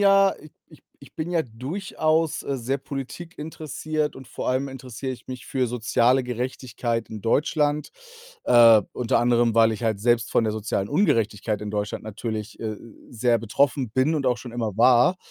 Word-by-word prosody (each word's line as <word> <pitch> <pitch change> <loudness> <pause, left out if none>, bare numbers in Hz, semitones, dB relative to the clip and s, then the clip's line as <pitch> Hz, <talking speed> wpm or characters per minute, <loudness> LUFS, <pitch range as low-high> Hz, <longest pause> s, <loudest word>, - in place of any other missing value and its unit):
ja 195 -1 +5
ich 155 - -14 0.2
ich - - -18 0.2
ich - - -17
bin 160 +2 -3
ja 165 -2 +2
durchaus, 155 - -1
äh, 140 - -2
sehr 130 +3 -2
politikinteressiert 155 +1 -5
und 135 -1 -11
vor - - -4
allem 130 +2 +1
interessiere 130 0 -6
ich 120 -2 -12
mich 130 -1 -7
für 130 -2 0
soziale 125 +2 +2
Gerechtigkeit 120 -1 -3
in 110 - -6
Deutschland, 150 +5 +1 0.5
äh, 115 -3 +7
unter 120 -2 +1
anderem, 120 -1 +3
weil 115 0 +5
ich 110 - -6
halt 110 -3 0
selbst 120 +1 +2
von - - +3
der 110 - 0
sozialen 105 -2 -2
Ungerechtigkeit 110 - +1
in 105 -1 -5
Deutschland 105 -1 -3
natürlich, 110 0 -5
äh, 110 -2 -3 0.3
sehr 120 0 +2
betroffen 125 +3 0
bin 130 +7 +2
und 140 -3 -1
auch 125 -1 +2
schon 125 - -9
immer 115 -4 -3
war. 125 +8 +5
125 Hz, 170 wpm, -24 LUFS, 115-145 Hz, 0.5 s, äh